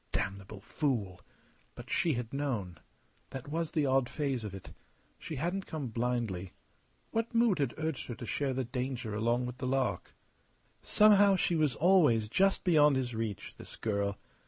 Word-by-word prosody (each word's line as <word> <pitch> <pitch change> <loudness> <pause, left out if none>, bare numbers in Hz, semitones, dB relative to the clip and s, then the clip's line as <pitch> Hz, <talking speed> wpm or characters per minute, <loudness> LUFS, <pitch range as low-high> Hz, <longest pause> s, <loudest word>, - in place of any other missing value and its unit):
Damnable 100 +1 -4
fool! 105 - -2 0.5
But - - -10
she 165 - +2
had 120 -1 -4
known. 115 - -3 0.5
That 135 +1 -7
was 165 +1 -1
the 155 -3 +2
odd 135 -2 +2
phase 135 -6 -2
of 100 -2 -6
it. 95 - -10 0.5
She 160 - -6
hadn't 175 +7 -2
come 145 -6 -4
blindly. 115 -6 -2 0.6
What 230 +1 -2
mood 230 -7 +3
had 135 -4 0
urged 160 -2 -3
her 120 - -5
to 120 - -8
share 135 +3 -1
the 130 - 0
danger 125 -2 -4
along 120 +3 +1
with 125 +1 -6
the 130 - -2
lark? 130 -1 -1 0.7
Somehow, 205 -2 +5
she 180 - +1
was 155 -5 +2
always 150 - +4
just 195 - +2
beyond 150 -5 +5
his 125 -2 -1
reach, 110 -4 -4
this - - -9
girl. 100 -2 -1
130 Hz, 165 wpm, -31 LUFS, 115-155 Hz, 0.7 s, Somehow